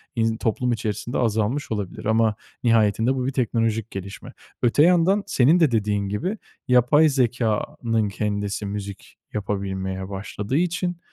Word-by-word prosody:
in 115 -1 +1
toplum 120 +2 0
içerisinde 110 +1 -3
azalmış 115 +4 0
olabilir 105 -4 -4
ama 110 0 +2 0.3
nihayetinde 115 +1 +3
bu 130 -1 -2
bir 135 - 0
teknolojik 115 -3 -1
gelişme. 95 -1 -8 0.3
Öte 125 +5 +4
yandan 180 +4 +4
senin 145 +8 +4
de 160 -6 +4
dediğin 105 -3 0
gibi 180 - -2 0.3
yapay 125 +5 +5
zekânın 115 -3 0
kendisi 100 0 -2
müzik 100 -1 -7 0.2
yapabilmeye 95 -2 -3
başladığı 105 +5 -3
için, 175 +1 -1
115 Hz, 130 wpm, -23 LUFS, 105-130 Hz, 0.3 s, yapay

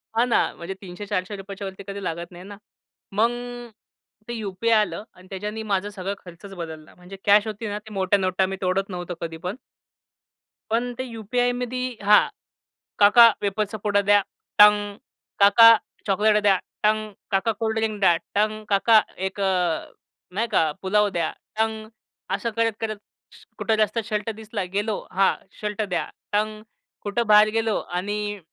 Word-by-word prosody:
हां 230 +2 +4
ना. - - +4 0.2
म्हणजे 175 +3 -6
₹300-400च्या 195 +1 -5
वरती 190 +1 -9
कधी 200 0 -6
लागत 170 +1 -4
नाही 175 +1 -11
ना. 200 +1 -10 0.6
मग 230 +2 +4 1.0
ते 240 - -4
यू-पी-आय 220 +1 0
आलं 210 0 -2
आणि 185 0 -18
त्याच्यानी 210 +3 -5
माझा 200 +1 0
सगळा 195 -1 -4
खर्चच 180 +3 -11
बदलला. 160 -3 -8
म्हणजे 180 +2 -12
कॅश 205 +1 +5
होती 215 +1 -5
ना, 205 0 -3
ते 215 0 -13
मोठ्या 195 +1 +2
नोटा 185 0 +1
मी 195 - -3
तोडत 190 +1 0
नव्हतो 175 -1 -5
कधी 165 -1 -5
पण. 180 +4 -5 1.2
पण 245 +2 0
ते 260 - -3
यू-पी-आयमध्ये 245 +2 -2
हां. 210 +1 +6 0.7
"काका 210 +3 +8
वेफर्सचा 205 +1 -1
पूडा 205 -1 +2
द्या." 205 0 +4 0.4
टंग! 205 -1 +6 0.4
"काका 230 +3 +8 0.3
चॉकलेट 210 +1 +3
द्या." 195 -2 +5 0.3
टंग! 215 0 +1 0.2
"काका 195 +4 +2
कोल्ड 220 +1 -2
ड्रिंक 220 -1 -1
द्या." 175 -4 +5 0.2
टंग! 215 +1 0
"काका 215 +2 +5 0.3
एक 190 - -9
अ, 195 - +2 0.8
नाही 220 +5 -1
का, 160 -8 +2
पुलाव 210 +2 +2
द्या." 170 -4 -1 0.3
टंग! 220 -1 -1 0.5
असं 230 - -3
करत-करत 225 -1 -1 0.6
कुठं 220 - +1
जास्त 215 +2 +1
शर्ट 210 +1 -2
दिसला 215 -2 -5
गेलो, 210 +1 0
"हां, 190 +1 +3 0.3
शर्ट 210 0 -2
द्या." 190 -4 -1 0.3
टंग! 215 +1 0 0.4
कुठं 210 +3 -1
बाहेर 210 0 +7
गेलो 225 -2 0
आणि 205 +3 -3
205 Hz, 150 wpm, -24 LUFS, 195-220 Hz, 1.2 s, काका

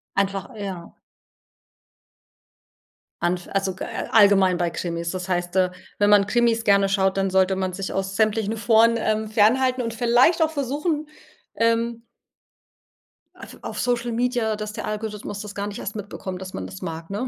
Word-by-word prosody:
Einfach 195 -1 -1
ja. 190 -5 -7 2.3
Anf 175 +1 -1
also, 195 -1 0
g - - -6
a - - -5
allgemein 200 -4 +5
bei 175 -1 0
Krimis? 170 0 -4
Das 185 0 -5
heißt, 175 0 -2
äh, 185 -1 +3 0.3
wenn 205 0 +3
man 205 -1 +5
Krimis 235 -1 +2
gerne 200 -2 +4
schaut, 195 0 +1
dann 195 0 +1
sollte 190 0 +3
man 185 -1 -2
sich 195 0 -4
aus 195 0 -3
sämtlichen 220 0 +1
Foren, 225 +2 +4
ähm, 220 0 0
fernhalten 250 +4 +3
und 230 -1 -3
vielleicht 245 +9 +4
auch 315 - 0
versuchen, 300 +2 -2 0.5
ähm 230 0 0 1.3
auf - - -12
auf - - -6
Social-Media, 240 -2 0
dass 210 0 -6
der - - -5
Algorithmus 210 -1 -5
das 210 -1 -8
gar 200 0 -3
nicht 205 - -6
erst 210 - -5
mitbekommt, 190 -2 -6
dass 185 0 -8
man 95 - -5
das 95 0 -9
mag, 165 +1 -6
ne? 220 +6 -2
205 Hz, 165 wpm, -23 LUFS, 190-230 Hz, 2.3 s, allgemein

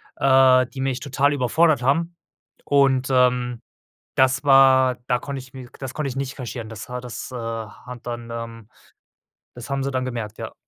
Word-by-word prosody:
äh, 130 -1 +5
die 135 - -11
mich 135 -1 -2
total 140 +1 +1
überfordert 145 +2 +2
haben. 165 +7 0 0.5
Und, 135 -2 +3
ähm, 125 -2 +2 0.5
das 130 +2 +3
war 130 -2 +5
da 125 -1 +2
konnte 140 +2 -6
ich 125 -1 -13
mir 130 -2 -9
k - - -18
das 135 -1 -6
konnte 150 -3 -2
ich 130 - -7
nicht 135 0 -4
kaschieren. 120 -3 -6
Das 110 0 -8
war 125 0 -5
das, 125 +1 -7
äh, - - -7
hat 115 +1 -7
dann, 120 -1 -6
ähm 115 -2 -7 0.9
das 120 +1 -9
haben 140 -1 -1
sie 140 - -2
dann 130 -1 -1
gemerkt, 115 -4 -5
ja. - - -6
130 Hz, 185 wpm, -22 LUFS, 120-135 Hz, 0.9 s, äh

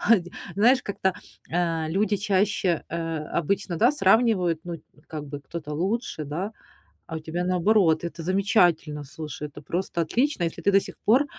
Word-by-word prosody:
а, 230 0 +5
дь 175 -1 -9 0.3
знаешь, 245 +6 +4
как-то, 190 -2 -1 0.4
а, 165 -2 0
люди 205 +5 +1
чаще, 195 -3 +1
э, 165 -1 -3 0.2
обычно, 175 +1 0
да, 240 - +5
сравнивают, 195 - +3
ну, 175 - -4 0.3
как 155 -2 -6
бы, 145 0 -6
кто-то 150 0 -6
лучше, 190 0 -2
да, 175 +9 -4 0.6
а 160 - -5
у - - -5
тебя 165 +3 -3
наоборот. 180 -2 +3
Это 170 0 -5
замечательно, 175 -6 +2
слушай, 150 +1 -6
это 145 0 -12
просто 170 +2 -2
отлично. 245 - +1
Если 165 - -2
ты 200 - +3
до 195 - +6
сих - - -8
пор, 255 +7 +5
175 Hz, 170 wpm, -25 LUFS, 160-200 Hz, 0.6 s, до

